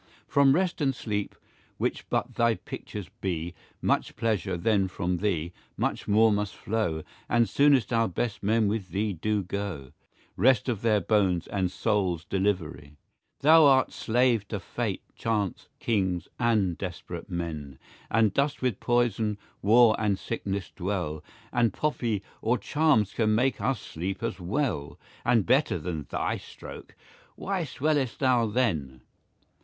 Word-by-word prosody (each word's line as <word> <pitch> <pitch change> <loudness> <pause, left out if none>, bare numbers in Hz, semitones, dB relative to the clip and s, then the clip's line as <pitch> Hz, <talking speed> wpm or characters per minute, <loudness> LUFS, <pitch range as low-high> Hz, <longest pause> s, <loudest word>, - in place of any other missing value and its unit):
From 140 -1 +4
rest 180 -2 0
and 135 -2 +1
sleepe, 105 -4 -3 0.4
which - - -2
but - - -1
thy 115 -1 +2
pictures 105 -3 -7
bee, 85 -3 -2 0.3
5 - - -35
Much - - +1
pleasure, 110 -5 -1
then 95 +2 +2
from 90 -1 -2
thee, 85 -3 -1 0.2
much - - -2
more 110 +2 +5
must 105 -1 -1
flow, 100 -8 -2 0.3
And 120 -1 +3
soonest 135 +1 +3
our 115 -1 +3
best 110 +4 -3
men 110 +1 +2
with 100 -3 -2
thee 100 +4 -1
doe 105 +5 0
goe, 90 -8 -5 0.4
Rest 125 +3 +3
of 115 -5 -1
their 110 -3 +3
bones, 95 -3 +2
and 95 -3 -1
soules 95 -6 0
deliverie. 85 -7 -2 0.5
Thou 160 +2 +7
art 135 -2 +5
slave 120 -3 +1
to - - -3
Fate, - - -3
Chance, 105 -5 -2
kings, 95 -6 0
and 110 -8 +1
desperate 90 -1 -6
men, 80 -6 -5 0.3
And 110 -2 +3
dost 140 +2 0
with 125 -6 0
poyson, 115 -3 +1 0.2
warre, 110 +2 +6
and 105 -3 +1
sicknesse 100 -4 -4
dwell, 90 -5 -3 0.3
10 120 - 0
And 115 -4 +3
poppie, 120 -9 -1 0.2
or 115 +3 +2
charmes 135 -3 +2
can 110 -2 +2
make 130 +4 +1
us 135 -5 0
sleepe 95 +6 -5
as 110 -5 -2
well, 95 - -2 0.3
And 115 -4 +3
better 135 -6 +3
then 80 -3 -5
thy - - -1
stroake; - - -11 0.4
why 190 -3 -2
swell'st 145 -2 0
thou 125 -4 +3
then? 80 - -1
105 Hz, 150 wpm, -27 LUFS, 90-120 Hz, 0.5 s, Thou